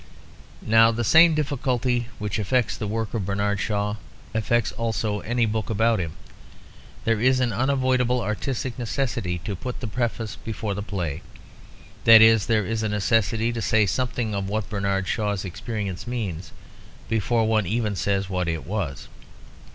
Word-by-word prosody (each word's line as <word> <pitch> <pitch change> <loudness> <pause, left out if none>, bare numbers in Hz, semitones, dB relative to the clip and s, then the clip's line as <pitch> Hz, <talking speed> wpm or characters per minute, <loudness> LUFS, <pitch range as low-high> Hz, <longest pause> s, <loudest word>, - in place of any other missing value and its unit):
Now 115 +1 +6
the 115 +1 -2
same 160 +7 +6
difficulty 130 -5 0
which 105 0 -3
affects 115 +3 +1
the 110 - -4
work 110 +1 -3
of 110 -4 -1
Bernard 100 0 0
Shaw 105 0 -1 0.4
affects 110 +1 +1
also 110 -2 -2
any 120 +2 0
book 110 -1 -2
about 115 0 +2
him. 80 -3 -3 0.9
There 115 -1 +1
is 130 +1 +4
an 120 -3 +1
unavoidable 130 0 +1
artistic 120 +3 -3
necessity 115 -7 -2
to 100 - -3
put 125 +7 -6
the 125 - -5
preface 115 -2 -3
before 110 -2 -4
the 100 - -4
play; 85 -7 -4 0.8
that 115 -1 +10
is, 110 -2 +6
there 110 -3 +2
is 115 +2 -2
a 110 - -1
necessity 110 +2 +1
to 115 - -3
say 110 0 +3
something 120 +1 -1
of 100 -1 -2
what 105 0 -3
Bernard 100 -2 -1
Shaw's 105 -3 -1
experience 100 +2 -5
means 95 -9 -4 0.6
before 115 +1 +1
one 110 -4 +1
even 110 0 -1
says 100 0 0
what 90 -2 -2
it 80 -1 -3
was. 95 -9 -4
110 Hz, 160 wpm, -24 LUFS, 100-120 Hz, 0.9 s, that